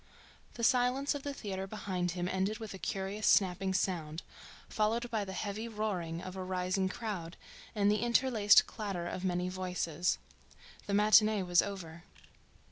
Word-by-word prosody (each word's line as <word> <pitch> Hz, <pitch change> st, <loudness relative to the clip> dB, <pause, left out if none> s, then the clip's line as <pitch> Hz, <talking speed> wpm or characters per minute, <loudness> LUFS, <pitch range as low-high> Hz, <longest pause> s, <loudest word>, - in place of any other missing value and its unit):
The 235 Hz, -, -5 dB
silence 255 Hz, +3 st, +3 dB
of 285 Hz, -, -5 dB
the 285 Hz, -, -4 dB
theatre 195 Hz, -7 st, -5 dB
behind 190 Hz, -3 st, -3 dB
him 175 Hz, 0 st, -1 dB
ended 190 Hz, +3 st, -1 dB
with 220 Hz, -2 st, -7 dB
a 190 Hz, -, -8 dB
curious 195 Hz, +3 st, -2 dB
snapping 190 Hz, 0 st, +3 dB
sound, 165 Hz, -4 st, -1 dB, 0.4 s
followed 230 Hz, +3 st, 0 dB
by 220 Hz, -3 st, 0 dB
the 190 Hz, -, -6 dB
heavy 210 Hz, +3 st, -4 dB
roaring 185 Hz, -7 st, -3 dB
of 185 Hz, 0 st, -7 dB
a 190 Hz, -, -4 dB
rising 185 Hz, +1 st, -1 dB
crowd 190 Hz, -6 st, -5 dB, 0.4 s
and 205 Hz, -1 st, +3 dB
the 210 Hz, -1 st, +1 dB
interlaced 235 Hz, -3 st, +5 dB
clatter 195 Hz, -6 st, -4 dB
of 180 Hz, -, -4 dB
many 180 Hz, -1 st, 0 dB
voices. 180 Hz, -2 st, -1 dB, 0.7 s
The 200 Hz, -, 0 dB
matinee 215 Hz, 0 st, +5 dB
was 175 Hz, -1 st, +4 dB
over. 170 Hz, -4 st, -7 dB
195 Hz, 155 wpm, -32 LUFS, 180-215 Hz, 0.7 s, interlaced